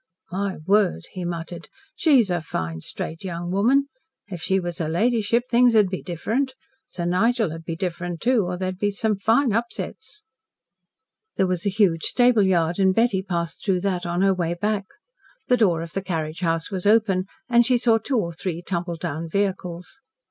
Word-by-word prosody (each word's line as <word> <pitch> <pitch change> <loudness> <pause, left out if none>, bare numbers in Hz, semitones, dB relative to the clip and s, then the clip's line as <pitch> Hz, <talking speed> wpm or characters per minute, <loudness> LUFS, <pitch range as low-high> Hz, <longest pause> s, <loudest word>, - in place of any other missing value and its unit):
"My 195 +1 -2
word," 195 - +2
he 185 - -6
muttered. 170 0 -6 0.3
"She's 260 - +4
a 175 -2 0
fine, 80 - -4
straight 165 - -6
young 175 -1 -4
woman. 245 +9 +3 0.4
If 180 -4 -6
she 190 +3 +1
was 175 -2 -5
her 160 -2 -1
ladyship 230 +5 +1
things 245 -1 +4
'ud 210 -3 +5
be 185 - -4
different. 235 - -2 0.3
Sir 175 - -5
Nigel 215 +2 +1
'ud 165 0 -9
be 165 - -3
different, 175 -1 -4
too 240 0 +2
or 180 0 -3
there'd 185 0 -3
be 205 - +1
some 210 +1 0
fine 225 +5 +2
upsets." 235 - -4 1.1
There 190 - +2
was 180 +1 -1
a - - +4
huge 190 -5 +2
stable 245 -3 +4
yard, 175 -2 +2
and 190 -1 +3
Betty 225 -4 +2
passed 170 -3 -4
through 190 -3 +1
that 180 -2 -1
on 175 +2 0
her 195 0 +4
way 175 -2 -1
back. 205 +2 -1 0.6
The 250 - +5
door 175 -8 +2
of 165 - -9
the 195 - -1
carriage 160 -4 -3
house 165 -1 -1
was 190 0 -2
open 205 -4 +3 0.2
and 240 -1 +5
she 250 +1 +3
saw 230 -2 +3
two 255 +4 -1
or 170 -6 -1
three 175 0 -4
tumbled 175 -2 -3
down 165 -1 -4
vehicles. 185 +2 -3
190 Hz, 185 wpm, -23 LUFS, 170-220 Hz, 1.1 s, ud